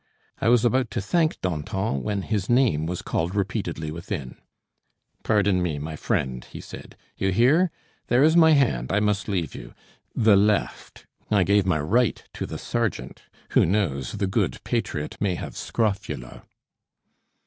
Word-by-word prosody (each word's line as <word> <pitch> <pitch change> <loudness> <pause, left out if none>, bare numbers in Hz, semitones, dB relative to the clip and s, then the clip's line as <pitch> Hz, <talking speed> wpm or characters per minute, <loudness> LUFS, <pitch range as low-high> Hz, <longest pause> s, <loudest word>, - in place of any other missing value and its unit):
I - - +2
was 120 -1 +4
about 125 0 +2
to - - +3
thank 160 - +1
Danton, 95 -1 -2
when 100 -2 -2
his 100 -2 -2
name 120 - +3
was 90 0 -4
called 85 +4 -2
repeatedly 95 -7 -2
within. 85 -5 -6 0.9
"Pardon 100 -4 +2
me, 85 -4 -1
my 75 +2 -5
friend," 65 -4 -2
he - - -10
said; - - -11 0.2
"you 95 - 0
hear? 135 - +4 0.4
There 125 +3 +4
is 160 +2 +5
my 160 -2 +7
hand; 90 - +1
I 100 - +2
must 105 -2 0
leave 90 -6 -2
you - - -10 0.4
the 110 -3 +5
left. 105 +1 0 0.2
I 100 -3 +3
gave 100 0 +2
my 90 -4 +2
right 110 +10 +1
to - - -4
the - - -6
sergeant. 110 - -3 0.3
Who - - +5
knows, 80 - 0
the - - -1
good 95 - -1
patriot 75 0 -3
may 95 -3 0
have - - -7
scrofula?" 95 - -3
100 Hz, 160 wpm, -24 LUFS, 80-115 Hz, 0.9 s, my